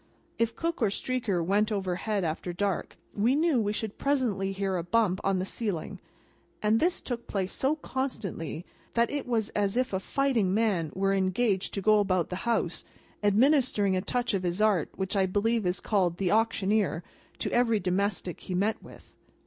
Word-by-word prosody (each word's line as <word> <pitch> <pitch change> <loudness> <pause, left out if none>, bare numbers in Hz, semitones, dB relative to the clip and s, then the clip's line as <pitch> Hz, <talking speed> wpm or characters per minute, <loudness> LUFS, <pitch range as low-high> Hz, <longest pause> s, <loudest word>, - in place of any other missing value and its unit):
If 230 0 +1
Cook 335 +1 -2
or 220 - +4
Streaker 200 -4 -1
went 205 +4 +2
overhead 195 +1 -1
after 165 +2 -2
dark, 195 +2 -2 0.2
we 230 +6 +2
knew 305 -5 +3
we 205 -1 0
should 215 0 -4
presently 235 -9 0
hear 195 -1 -1
a 170 - -2
bump 190 +1 +1
on 195 -1 +2
the 185 - -1
ceiling; 195 -3 -4 0.6
and 215 +1 +2
this 350 +2 +1
took 240 -2 -5
place 190 -2 -2
so 275 +3 +1
constantly, 220 - -4 0.3
that 235 0 +2
it 285 -2 -3
was 225 -3 0
as 205 +1 0
if 255 -3 0
a 190 - +1
fighting 230 -5 +1
man 200 -8 +1
were 195 +1 +1
engaged 190 +1 0
to 195 - -3
go 215 +1 +5
about 185 -4 +1
the 180 - -3
house, 210 -7 0 0.4
administering 210 -2 +3
a 185 - +1
touch 245 +4 -1
of 195 - +1
his 175 +1 -2
art 210 -7 +3
which 190 +1 -3
I 190 -1 +3
believe 210 +2 +1
is 180 - 0
called 180 -5 +1
The 185 -2 0
Auctioneer, 210 -5 +1 0.3
to - - -3
every 235 -3 +3
domestic 185 -1 -1
he 185 - -5
met 205 +4 0
with. - - -15
205 Hz, 180 wpm, -28 LUFS, 185-230 Hz, 0.6 s, go